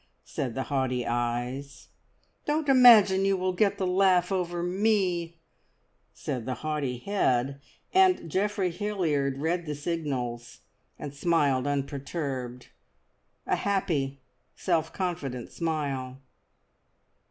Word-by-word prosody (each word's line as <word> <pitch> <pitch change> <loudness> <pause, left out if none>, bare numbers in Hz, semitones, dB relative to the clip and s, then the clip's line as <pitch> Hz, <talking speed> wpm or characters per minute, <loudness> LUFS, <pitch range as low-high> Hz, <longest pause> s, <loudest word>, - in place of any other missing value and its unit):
said 125 - -4
the 135 - -1
haughty 130 -3 -1
eyes. 120 +3 -3 0.6
"Don't 300 0 0
imagine 230 -8 +7
you 195 0 +2
will 185 0 -1
get 200 +2 +2
the 190 - -1
laugh 185 -1 +3
over 175 -2 -1
me," 180 -3 0 0.7
said 125 -2 -5
the 130 - -1
haughty 145 -5 -1
head, 140 -5 0 0.3
and 375 - +4
Geoffrey 190 +2 0
Hilliard 165 -9 -1
read 165 +3 -1
the 150 - -3
signals, 130 -7 -4 0.4
and 145 -2 -7
smiled 145 -4 +1
unperturbed 140 -3 -4 0.8
a - - +1
happy, 155 -9 -1 0.4
self 165 -3 0
confident 140 -10 -4
smile. 140 -6 -3
155 Hz, 110 wpm, -27 LUFS, 135-185 Hz, 0.8 s, imagine